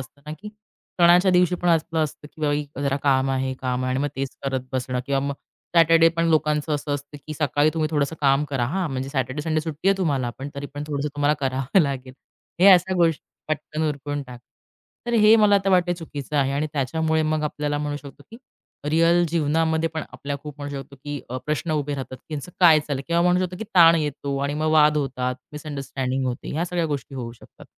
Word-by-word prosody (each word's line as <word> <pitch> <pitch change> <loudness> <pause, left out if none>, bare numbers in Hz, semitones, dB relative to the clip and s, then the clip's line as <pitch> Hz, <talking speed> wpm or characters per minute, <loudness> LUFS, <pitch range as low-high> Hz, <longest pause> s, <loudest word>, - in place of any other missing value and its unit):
असतं 130 +2 -12
ना, 150 - -5
की 210 - -8 0.5
सणाच्या 175 +2 +6
दिवशी 180 -1 +3
पण 175 0 -2
असंच 165 0 +1
असतं, 150 -1 -5
की 150 -1 0 0.2
जरा 140 -1 +1
काम 135 -1 +2
आहे, 130 0 -1
काम 130 -1 -1
आहे, 130 - -1
आणि 130 - 0
मग 145 - 0
तेच 135 0 -3
करत 135 -1 -1
बसणं. 125 -1 -2
किंवा 135 -1 +1
मग 140 0 -2 0.4
सॅटर्डे 165 0 +6
पण 165 0 +2
लोकांचं 150 -1 +1
असं 145 0 -2
असतं, 145 +1 -7
की 155 - -5
सकाळी 150 0 +2
तुम्ही 155 -1 0
थोडंसं 150 0 0
काम 140 +1 +3
करा. 135 -3 0
हां, 180 +5 -1
म्हणजे 130 0 -3
सॅटर्डे-संडे 140 +3 -2
म्हणजे 155 - +2
सुट्टी 155 +6 -2
आहे 195 - +4
तुम्हाला, 140 -9 0
पण 135 +2 -5
तरी 140 0 -5
पण 145 +1 -4
थोडंसं 145 -1 -2
तुम्हाला 145 +1 +2
कराव 135 +5 +1
लागेल. 135 -4 -2 0.5
हे 190 - +7
असं 185 +1 +5
गोष्टी 165 -3 +2 0.3
पटकन 155 +1 -2
उरकून 145 0 -4
टाका. 125 -2 -12 0.6
तर 240 - -2
हे 215 +1 +7
मला 210 -2 +5
तर 195 - +2
वाटतं, 180 -1 +3
चुकीचं 150 -4 -6
आहे. 135 -1 +2
आणि 145 +2 0
त्याच्यामुळे 160 +3 0
मग 155 0 0
आपल्याला 150 0 -2
म्हणू 145 0 -3
शकतो 140 -1 -12
की, 225 - -10 0.5
रिअल 165 +2 +4
जीवनामध्ये 160 0 +1
पण 160 - -2
आपल्या 140 0 -5
खूप 150 -1 -8
म्हणू 145 0 -5
शकतो, 140 0 -9
की 145 -2 -4
अ, 130 - -3
प्रश्न 150 +2 -2
उभे 145 -1 -1
राहतात. 130 -1 -6
त्यांचं 155 +1 -6
काय 165 -4 +7
चाललंय. 145 -2 -4
किंवा 170 0 +2
म्हणू 180 +1 +3
शकतो, 180 0 -6
की - - -4
ताण 170 -2 +8
येतो 145 -2 -2
आणि 140 +1 -1
मग 155 +1 0
वाद 150 -1 +5
होतात, 130 -3 -1 0.2
मिसअंडरस्टँडिंग 135 -3 -3
होते. 125 -1 -4
ह्या 160 +4 -1
सगळ्या 175 -1 -1
गोष्टी 145 -2 -4
होऊ 120 -3 -5
शकतात. 115 - -17
150 Hz, 210 wpm, -23 LUFS, 140-165 Hz, 0.6 s, ताण